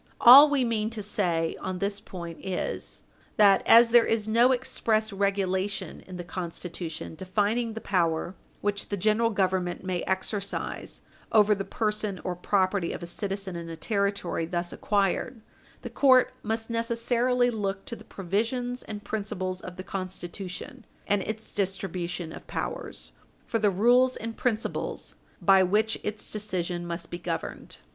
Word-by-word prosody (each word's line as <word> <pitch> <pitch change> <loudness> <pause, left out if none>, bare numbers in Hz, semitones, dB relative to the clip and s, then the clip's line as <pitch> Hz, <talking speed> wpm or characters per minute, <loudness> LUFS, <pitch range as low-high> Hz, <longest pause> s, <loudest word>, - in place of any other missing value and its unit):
All 275 +5 +10
we 285 -3 +2
mean 220 -2 0
to 210 - -3
say 175 -5 0
on 185 -1 -4
this 200 +2 -1
point 170 -3 -8
is 190 -1 -4 0.3
that, 200 -2 +6
as 230 0 +8
there 240 -1 +7
is 220 -1 0
no 235 +4 +5
express 220 -4 0
regulation 195 0 -1
in 185 -1 -7
the 175 - -5
Constitution 170 -2 -6
defining 205 +7 0
the 225 - -6
power 170 -2 0 0.3
which 205 0 -2
the 205 - -2
General 215 +4 +2
Government 185 -4 0
may 185 -2 -2
exercise 195 +1 -3 0.3
over 210 -1 +5
the 195 -1 -2
person 210 -2 -2
or 180 - -2
property 185 0 +1
of - - -6
a - - -3
citizen 195 +1 -4
in 170 -1 -6
a 165 - -5
Territory 200 -3 -1
thus 175 0 -3
acquired, 205 +3 0 0.4
the - - -5
court 260 -3 +5
must 225 +1 -3
necessarily 240 +2 +1
look 195 -3 -3
to 235 - -5
the - - -13
provisions 230 +7 -2
and 210 -1 -7
principles 190 -3 -3
of 180 - -8
the 185 - -7
Constitution 185 -1 -6 0.2
and 205 -1 +1
its 220 +2 -5
distribution 180 -3 -3
of - - -11
powers - - -5 0.3
for 230 - -1
the 210 -1 +4
rules 245 +6 +4
and 225 0 -5
principles 230 -3 -2 0.3
by 195 -1 +6
which 210 +4 +2
its 210 0 -5
decision 180 -4 -3
must 170 -1 -5
be 175 - -4
governed. 170 -1 -5
200 Hz, 150 wpm, -27 LUFS, 185-220 Hz, 0.4 s, All